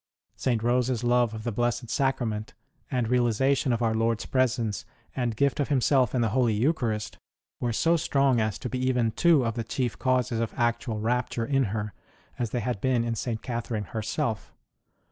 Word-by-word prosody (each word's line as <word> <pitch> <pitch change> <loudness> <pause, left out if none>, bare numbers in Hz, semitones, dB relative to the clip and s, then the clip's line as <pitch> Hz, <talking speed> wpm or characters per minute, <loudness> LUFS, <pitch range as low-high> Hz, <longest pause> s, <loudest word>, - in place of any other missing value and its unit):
St. 120 -4 0
Rose 125 +1 +2
s 125 -2 -1
love 120 -2 +2
of 110 - -7
the 120 - -2
Blessed 120 +2 -1
Sacrament, 115 -6 -1 0.3
and 125 -3 0
realization 125 +3 +2
of 120 0 0
Our 110 -1 +2
Lord 115 0 +1
s - - -6
presence 120 -4 0 0.3
and 120 -4 -1
gift 140 +5 +1
of 145 - +1
Himself 130 -3 +3
in 125 - +2
the 115 - +2
Holy 120 -4 +2
Eucharist, 110 - -1 0.4
were 120 - -1
so 165 +9 +2
strong 135 -5 +2
as 110 -2 -1
to 125 - -5
be 125 +1 -3
even 125 -3 +1
two 160 -1 +4
of 115 - 0
the 115 0 -3
chief 120 +1 -2
causes 125 -3 +1
of 115 -1 -2
actual 120 -2 0
rapture 120 +1 -1
in 135 +1 +2
her, 105 0 -3 0.5
as 120 -2 -1
they 120 - -2
had 120 -5 -3
been 125 -3 +2
in 115 0 -1
St. 115 0 -3
Catherine 115 -3 -3
herself. 110 +1 -2
120 Hz, 190 wpm, -27 LUFS, 110-130 Hz, 0.5 s, two